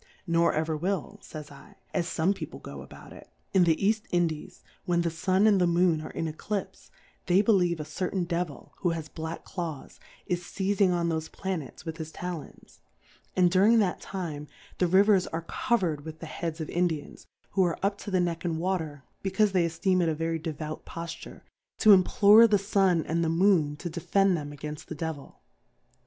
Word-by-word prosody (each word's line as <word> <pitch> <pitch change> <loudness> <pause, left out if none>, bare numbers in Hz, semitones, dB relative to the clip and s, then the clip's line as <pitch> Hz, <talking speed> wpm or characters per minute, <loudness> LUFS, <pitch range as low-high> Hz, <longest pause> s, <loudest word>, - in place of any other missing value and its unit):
N' 170 - 0
or 170 0 +4
ever 160 +1 -1
will, 195 +5 -3
/ - - -33
Jyj" 145 -3 -11
/, - - -37
as 170 - 0
fome 175 +3 +1
People - - -8
go - - -9
about - - -12
it. - - -14 0.2
In 185 -2 +5
the 165 -1 +4
Eajt 215 +5 0
Indies^ 165 -3 -1 0.2
when 175 -1 +1
the 170 - 0
Sun 185 +5 +2
and 205 -3 +5
the 180 - +4
Moon 170 -2 +3
are - - -7
in 165 - -3
Eclipfe, 190 +5 -5 0.4
they 185 +3 +4
believe 180 -7 +3
a 150 - -4
certain 180 +4 -2
Devil, 170 -4 -4
who 180 - 0
has 155 -1 -7
black 160 0 -6
Claws, 165 -7 -6 0.3
is 175 -1 -1
feizing 195 +2 +1
on 170 -1 +1
thofe 160 -1 -3
Planets 185 -8 -5
with 160 -1 -5
his 160 -2 -6
Talons; 175 -5 -8 0.6
and 180 -1 +4
during 200 +5 +5
that 200 -5 +1
Time> 155 -6 -5 0.3
the 180 - +3
Rivers 195 +1 +4
are 165 0 -4
covered 185 - 0
with 160 0 -8
the 165 - -8
Heads 165 +1 -5
of 160 - -4
Indians^ 170 -4 -2 0.2
who 190 - +3
are 175 -2 0
up 200 0 0
to - - -7
the 190 -2 +2
Neck 170 -1 -1
ia 175 - 0
Water, 160 -4 -2 0.2
becaufe 200 +2 +2
they 180 -3 +2
efteem 185 +3 +1
it 170 - +2
a 155 - 0
very 165 +1 -2
devout 155 -1 -5
Pofture, 165 -1 -8 0.4
to 215 - +7
implore 210 +3 +7
the 210 -2 +4
Sun 195 -4 +2
and 170 +1 0
the 165 - +1
Moon 165 -4 +3
to 175 - -6
defend 185 +3 +2
them 145 -3 -4
againft 150 +1 -7
the 160 - -7
Devil. 155 -2 -6
175 Hz, 195 wpm, -28 LUFS, 160-190 Hz, 0.6 s, to